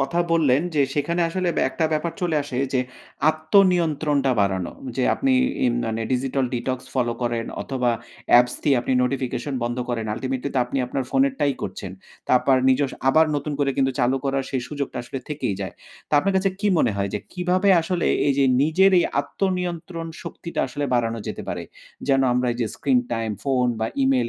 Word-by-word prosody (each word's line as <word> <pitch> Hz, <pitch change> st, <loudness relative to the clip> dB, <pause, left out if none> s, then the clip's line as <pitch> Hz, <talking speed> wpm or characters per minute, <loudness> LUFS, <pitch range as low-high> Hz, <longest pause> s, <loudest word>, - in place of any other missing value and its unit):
কথা 140 Hz, +6 st, 0 dB
বললেন, 150 Hz, -4 st, +3 dB
যে 145 Hz, -, +4 dB
সেখানে 170 Hz, +4 st, 0 dB
আসলে 185 Hz, +1 st, -1 dB
ব্যা -, -, +2 dB
একটা 165 Hz, -, -1 dB
ব্যাপার 160 Hz, +2 st, -1 dB
চলে 170 Hz, -3 st, 0 dB
আসে 140 Hz, -3 st, -6 dB, 0.2 s
যে 130 Hz, -, +2 dB, 0.5 s
আত্মনিয়ন্ত্রণটা 155 Hz, -4 st, +2 dB
বাড়ানো 95 Hz, -3 st, 0 dB, 0.2 s
যে 130 Hz, -, +1 dB
আপনি 270 Hz, -1 st, +1 dB, 0.3 s
ইম 120 Hz, -, +2 dB
মানে 115 Hz, 0 st, -2 dB
digital 130 Hz, +1 st, 0 dB
detox 125 Hz, +1 st, -2 dB
ফলো 120 Hz, -3 st, +1 dB
করেন 120 Hz, -1 st, -1 dB, 0.2 s
অথবা 125 Hz, -3 st, 0 dB, 0.4 s
অ্যাপস 125 Hz, 0 st, +6 dB
দিয়ে 140 Hz, -3 st, +3 dB
আপনি 125 Hz, -, -2 dB
নোটিফিকেশন 130 Hz, +1 st, -2 dB
বন্ধ 120 Hz, +1 st, -2 dB
করেন 115 Hz, -2 st, -2 dB
ultimately 130 Hz, +3 st, -3 dB
তো -, -, +2 dB
আপনি 130 Hz, +3 st, -3 dB
আপনার 135 Hz, +1 st, -2 dB
ফোনের 270 Hz, 0 st, +3 dB
টাই 140 Hz, -1 st, +3 dB
করছেন। 95 Hz, 0 st, -5 dB, 0.4 s
তারপর 130 Hz, +1 st, +4 dB
নিজস্ব 135 Hz, +1 st, +2 dB
আবার 160 Hz, +4 st, +5 dB
নতুন 145 Hz, +1 st, -3 dB
করে 140 Hz, -1 st, +2 dB, 0.3 s
চালু 125 Hz, +2 st, +2 dB
করার 135 Hz, -1 st, 0 dB
সেই 130 Hz, -3 st, -1 dB
সুযোগটা 145 Hz, -2 st, -4 dB
আসলে 125 Hz, +2 st, -6 dB
থেকেই 140 Hz, -8 st, -2 dB
যায়। 95 Hz, -3 st, -4 dB, 0.4 s
তো -, -, -27 dB
আপনার 195 Hz, +6 st, +1 dB
কাছে 190 Hz, +1 st, +2 dB
কি 210 Hz, -, 0 dB
মনে 120 Hz, -7 st, +2 dB
হয় 100 Hz, 0 st, -1 dB
যে -, -, 0 dB
কিভাবে 180 Hz, +2 st, +1 dB
আসলে 170 Hz, +1 st, -1 dB, 0.2 s
এই 140 Hz, -, +4 dB
যে 140 Hz, -, +5 dB, 0.2 s
নিজের 180 Hz, +6 st, +4 dB
এই -, -, +3 dB, 0.2 s
আত্মনিয়ন্ত্রণ 175 Hz, -3 st, -3 dB, 0.2 s
শক্তিটা 170 Hz, -, -5 dB
আসলে 145 Hz, +3 st, -3 dB
বাড়ানো 115 Hz, -1 st, 0 dB
যেতে -, -, -5 dB
পারে। -, -, -3 dB, 0.5 s
যেন 135 Hz, -1 st, +4 dB
আমরা 125 Hz, +1 st, +1 dB
এই 120 Hz, -, -7 dB
যে 115 Hz, -, +1 dB
screen 130 Hz, -3 st, +2 dB
time 115 Hz, -2 st, -2 dB
ফোন 130 Hz, -3 st, +2 dB
বা 110 Hz, -, +1 dB, 0.2 s
ইমেইল 130 Hz, -3 st, +2 dB
135 Hz, 185 wpm, -23 LUFS, 125-160 Hz, 0.5 s, অ্যাপস